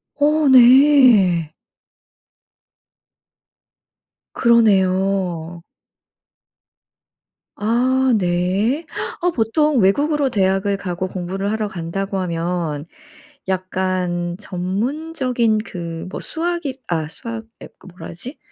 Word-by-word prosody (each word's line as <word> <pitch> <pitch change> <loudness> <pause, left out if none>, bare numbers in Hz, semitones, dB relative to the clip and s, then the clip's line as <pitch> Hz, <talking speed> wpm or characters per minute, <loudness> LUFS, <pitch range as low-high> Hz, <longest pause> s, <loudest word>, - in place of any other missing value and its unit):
어 300 +1 +2
네. 245 - +6 2.8
그러네요. 190 -6 +1 1.9
아 255 +4 +1
네. 190 - 0 0.4
아 355 - +2
보통 300 +2 +1
외국으로 285 +8 +2
대학을 195 -2 +1
가고 185 -1 -4
공부를 190 +2 -4
하러 220 -1 -2
간다고 195 +2 -4
하면 170 -4 -3 0.6
약간 185 -2 -2
전문적인 235 - -1
그 170 -5 -7
뭐 - - -6
수학이 325 -5 -3
아 160 -3 -2
수학 230 +6 -7 0.2
아 - - -9
그 - - -18
뭐라 180 +1 -11
하지? 240 - -9
195 Hz, 160 characters per minute, -19 LUFS, 180-255 Hz, 2.8 s, 네